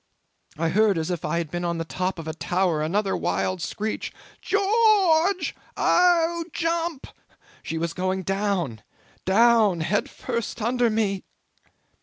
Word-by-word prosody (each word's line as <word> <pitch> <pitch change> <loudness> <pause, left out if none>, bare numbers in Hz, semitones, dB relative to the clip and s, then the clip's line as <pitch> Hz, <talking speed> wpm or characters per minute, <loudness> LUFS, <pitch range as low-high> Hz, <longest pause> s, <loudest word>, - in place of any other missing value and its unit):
I 165 +1 0
heard 205 +1 +3
as 160 +2 -2
if 175 - -3
I 155 +2 -1
had 165 -3 -3
been 175 0 -3
on 170 -1 -1
the 165 - -3
top 185 +3 -2
of 165 -1 -7
a 160 - -3
tower 175 -1 0
another 190 +5 0
wild 185 -1 -1
screech, 215 +5 -3 0.3
'Geo 405 - 0
o - - 0
o 400 -6 +4
orge! 390 -2 -3 0.2
Oh, 340 -1 +3
jump!' 330 -3 -2 0.6
She 165 - -4
was 165 +1 -2
going 185 0 -2
down, 195 - -1 0.4
down, 215 -3 +4
head 205 - 0
first 235 -3 -4
under 240 +1 +1
me. 210 -3 0
200 Hz, 155 wpm, -24 LUFS, 170-270 Hz, 0.6 s, o